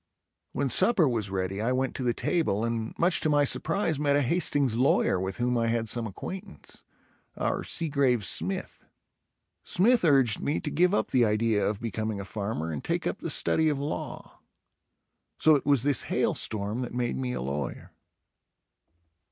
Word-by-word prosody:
When 140 +1 -1
supper 185 - +4
was 115 -6 -1
ready 95 +1 -3
I 115 +3 0
went 130 0 -1
to - - -5
the 120 - +2
table 115 - 0
and 115 -1 -3
much 175 +1 +3
to 155 - +1
my 145 -1 +3
surprise 160 +2 0
met 145 -1 +2
a 145 - +2
Hastings 140 -4 +1
lawyer 125 -6 +2
with 95 +1 -4
whom 125 0 0
I 115 - 0
had 115 0 -1
some 115 +1 -2
acquaintance, 110 - -9 0.5
our - - -1
Seagrave 140 - 0
Smith. - - 0 0.8
Smith 230 +5 +2
urged 135 -9 +3
me 145 - -1
to 150 - -5
give 180 +6 +2
up - - -1
the 130 -3 +4
idea 110 -1 +1
of 105 -1 -1
becoming 110 -2 -3
a 100 - -6
farmer 100 -6 -4
and 75 - -5
take - - -2
up - - -2
the - - -5
study 160 -1 +2
of 145 - -1
law. 145 +2 -6 1.0
So 155 - +5
it 145 -2 0
was 140 -5 +4
this 140 -4 +2
hail - - +1
storm 105 +3 -2
that 125 -1 -5
made 120 -1 -1
me 125 -1 -3
a - - -4
lawyer. 70 0 -5
125 Hz, 175 wpm, -27 LUFS, 110-145 Hz, 1.0 s, So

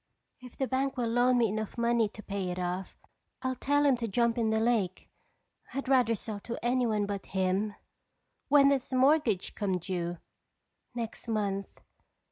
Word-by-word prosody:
If 250 -1 -13
the 265 - 0
bank 265 +1 -1
will 240 -2 0
loan 245 +2 +3
me 230 -3 +3
enough 215 +2 -4
money 235 -2 +2
to 215 +1 -12
pay 195 -2 -3
it 180 - -4
off, 180 +1 -3 0.5
I'll 260 0 0
tell 285 +3 +1
him 275 -2 +5
to 235 -1 -3
jump 235 +2 +2
in 230 -2 +1
the 220 0 +2
lake. 220 -6 0 0.6
I'd 275 -1 -3
rather 250 -4 +4
sell 210 0 -6
to 235 +3 -6
anyone 240 -4 +2
but 200 -1 -5
him." 190 +3 +1 0.7
"When 280 0 +6
does 275 -2 0
the 260 - -2
mortgage 255 -7 +3
come 195 -3 -1
due?" 175 -1 -3 0.8
"Next 235 -1 -5
month." 200 -3 -2
230 Hz, 170 wpm, -30 LUFS, 200-255 Hz, 0.8 s, When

